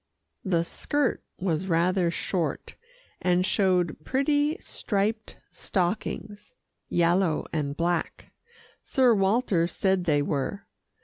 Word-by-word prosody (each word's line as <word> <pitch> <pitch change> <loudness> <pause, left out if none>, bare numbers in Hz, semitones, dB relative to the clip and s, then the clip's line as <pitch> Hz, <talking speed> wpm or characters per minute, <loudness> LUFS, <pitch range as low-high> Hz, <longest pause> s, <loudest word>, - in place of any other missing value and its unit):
The 175 -4 +1
skirt 290 - -1 0.2
was 180 -1 -1
rather 175 +1 +2
short, 170 0 -2 0.5
and 180 0 +2
showed 180 -6 +1
pretty 290 - +1
striped 215 - -2
stockings 205 - -3 0.3
yellow 175 -1 +2
and 145 -2 -2
black, 170 0 -2 0.5
Sir 255 -4 +3
Walter 195 -3 +2
said 190 0 0
they 145 -3 +2
were. 145 +8 -2
185 Hz, 100 wpm, -27 LUFS, 170-210 Hz, 0.5 s, Sir